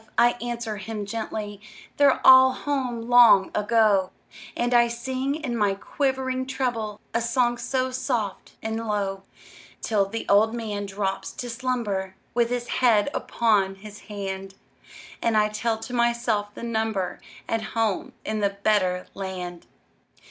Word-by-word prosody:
I 240 0 +6
answer 235 -3 -4
him 210 +1 -5
gently, 210 -1 -5 0.4
"They're 285 -2 +4
all 260 0 +9
home 255 -4 -2
long 240 -6 +7
ago;" 210 -3 +3 0.5
And 240 +1 0
I 240 0 +6
sing, 260 +4 -2
in 290 -6 -3
my 205 -3 +1
quivering 260 +2 -2
treble, 230 -6 -2
A 230 - +1
song 240 +1 +1
so 255 +1 -1
soft 240 -6 -3
and 220 0 -2
low, 200 -2 -1 0.6
Till 205 -3 +1
the 225 +3 -5
old 220 +3 +4
man 210 -3 -4
drops 195 0 -3
to 245 -1 -5
slumber, 230 -6 -2 0.2
With 235 -1 +2
his 245 0 -2
head 235 0 +3
upon 205 -5 +1
his 210 +2 -11
hand, 195 -2 -6 0.7
And 230 -2 +2
I 210 0 +3
tell 220 +1 -1
to 235 +3 -8
myself 235 -3 +1
the - - -8
number 220 -5 -2 0.3
At 225 0 -1 0.2
home 220 -4 0
in 215 0 -2
the 200 -1 0
better 185 -4 +2
land. 180 -3 -6
225 Hz, 140 wpm, -25 LUFS, 205-240 Hz, 0.7 s, all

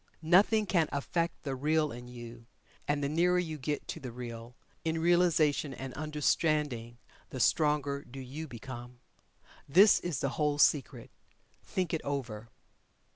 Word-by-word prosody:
Nothing 200 +6 +4
can 170 -5 +2
affect 165 +4 -2
the 135 -2 -3
Real 150 +3 +1
in 120 +1 -9
you 120 -1 -10 0.4
and 145 0 0
the - - +1
nearer 175 +4 +2
you 160 -4 -2
get 145 +2 -3
to - - -4
the 130 -3 -7
Real, 120 0 -8 0.3
in 160 0 -1
realization 160 -5 +2
and 135 -1 -7
understanding, 150 -5 0 0.3
the 130 - -6
stronger 145 +1 +2
do 135 +2 -10
you 140 +5 -7
become. 120 -1 -9 0.7
This 195 +9 +7
is 175 -6 -3
the 140 - 0
whole 150 +1 0
secret. 145 -2 +2 0.5
Think 185 -2 -2
it 160 - 0
over. 120 -6 -4
145 Hz, 145 wpm, -31 LUFS, 125-160 Hz, 0.7 s, This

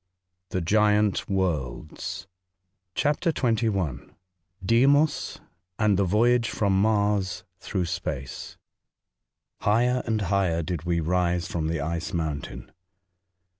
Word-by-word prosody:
— 90 0 -54
THE 95 - -2
GIANT 105 +2 +2
WORLDS. 80 -8 -2 0.7
CHAPTEH 150 0 0 0.3
I. 85 -8 0 0.7
DEIMOS, 140 +8 +3 0.4
AND 105 -2 +3
THE - - +4
VOYAGE 115 +5 +3
FEOM 95 -2 +1
MAES 100 -3 +1 0.2
THEOUGH 95 -4 -2
SPACE. 80 -6 -5 1.0
HIGHER 120 +4 +2
and 110 -1 0
higher 90 -3 +1
did 85 -1 -4
we 85 -1 +1
rise 90 +1 0
from 80 -2 -2
the 80 -2 -1
Ice 85 +4 -3
Mountain. 80 -4 -4
95 Hz, 105 wpm, -26 LUFS, 85-105 Hz, 1.0 s, THE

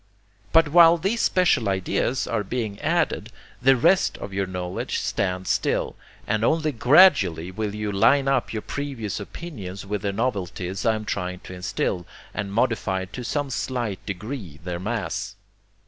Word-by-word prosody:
But 165 -2 +5
while 170 +1 +7
these 200 +7 0
special 180 - +3
ideas 100 +7 0
are 110 -3 -1
being 110 -1 -3
added, - - 0 0.3
the 135 +2 +6
rest 180 +9 +3
of 100 - -7
your 95 0 -1
knowledge 90 -1 -3
stands 95 -1 -1
still, - - 0 0.3
and 110 +1 0
only 155 +4 +2
gradually 115 - +5
will 105 +1 -3
you 105 -1 -2
'line 115 +8 +4
up' 135 -2 +1
your 110 -2 -4
previous 135 -9 -4
opinions 100 - -7
with 100 0 -3
the 100 - -1
novelties 100 -2 -2
I 110 - +4
am 110 0 -5
trying 90 -2 -3
to - - -10
instil, 90 -1 -2 0.3
and 100 -1 -4
modify 100 -4 0
to 100 +7 -8
some 145 +2 -2
slight 120 -6 -3
degree 100 - -6
their 90 -1 -4
mass. 105 -1 -3
105 Hz, 155 wpm, -24 LUFS, 95-130 Hz, 0.3 s, while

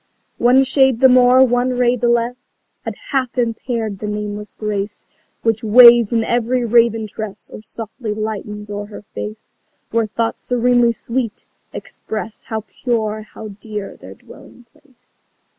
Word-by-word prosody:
One 245 +1 +4 0.2
ray 265 -2 +6
the 255 +3 +5
more, 255 +1 +6
one 245 0 +1
shade 245 -1 +1
the 240 - +2
less 240 +1 -2 0.3
Had - - -5 0.2
half 260 -3 -1
impaired 230 -3 -2
the 210 - -5
nameless 210 0 -5
grace 205 -1 -4 0.4
Which 225 -1 0
waves 235 0 +7
in 230 -1 +1
every 240 +1 0
raven 230 -1 +3
tress 210 -1 -8
Or - - -9
softly 220 +1 -7
lightens 210 -1 -5
o'er 205 0 -5
her 210 - -11
face, 105 +1 -7 0.4
Where 230 -1 +1
thoughts 225 +2 -2
serenely 245 -1 +2
sweet 235 -1 -4 0.3
express 220 0 -7
How 220 -2 -4 0.2
pure, 220 -3 -1
how 215 0 -10
dear 210 0 -7
their - - -13
dwelling 245 - -16
place. 255 -5 -28
230 Hz, 145 wpm, -18 LUFS, 210-245 Hz, 0.4 s, waves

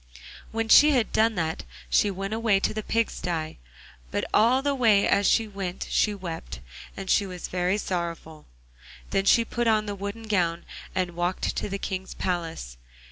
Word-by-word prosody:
When 225 0 -2
she 295 +6 +7
had 245 -5 +1
done 220 0 +2
that 160 -2 -2 0.2
she 130 - +3
went 195 +2 -4
away 220 -3 +2
to - - 0
the 215 - -3
pig 230 +1 0
sty, 160 -3 -4 0.5
but - - -2
all 240 +5 +4
the 285 0 +1
way 225 -7 +4
as 200 -1 +3
she 225 -1 +3
went 195 -3 -5
she 210 -1 +2
wept, 165 - -7 0.4
and 195 - -6
was 185 -3 -6
very 180 +2 0
sorrowful. 170 -5 -5 0.6
Then 195 - +1
she 230 +3 +5
put 240 +1 -2
on 215 -1 +3
the 205 - -3
wooden 200 +3 -6
gown, 175 -6 0 0.3
and 185 -1 0
walked 175 +1 -1
to - - -3
the 200 - -3
King's 190 -1 -5
palace. 165 - -3
195 Hz, 175 wpm, -26 LUFS, 175-220 Hz, 0.6 s, she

